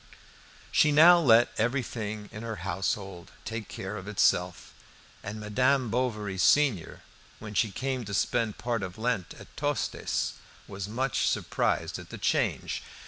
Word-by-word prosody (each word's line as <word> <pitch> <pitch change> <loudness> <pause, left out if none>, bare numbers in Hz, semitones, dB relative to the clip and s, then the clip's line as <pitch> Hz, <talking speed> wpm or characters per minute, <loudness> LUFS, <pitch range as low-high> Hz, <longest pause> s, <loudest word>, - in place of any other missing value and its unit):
She 150 - +4
now 170 +4 +8
let 120 -6 +5
everything 110 -3 -2
in 105 - -8
her 115 -1 -4
household 95 -1 -3 0.2
take 110 -2 -5
care 100 +2 -6
of 95 0 -8
itself, 90 -4 +1 0.5
and 105 +2 -6
Madame 125 +3 +1
Bovary 105 -6 -2
senior, 130 - +2 0.4
when 105 0 -9
she 110 +2 +2
came 130 +3 -3
to 100 - -6
spend 115 +2 0
part 115 +1 -2
of 90 -2 -6
Lent 115 -5 -2
at - - -15
Tostes, - - -1 0.3
was 100 +1 -6
much 130 +3 0
surprised - - -1
at - - -11
the - - -7
change. - - 0
110 Hz, 140 wpm, -28 LUFS, 100-125 Hz, 0.5 s, now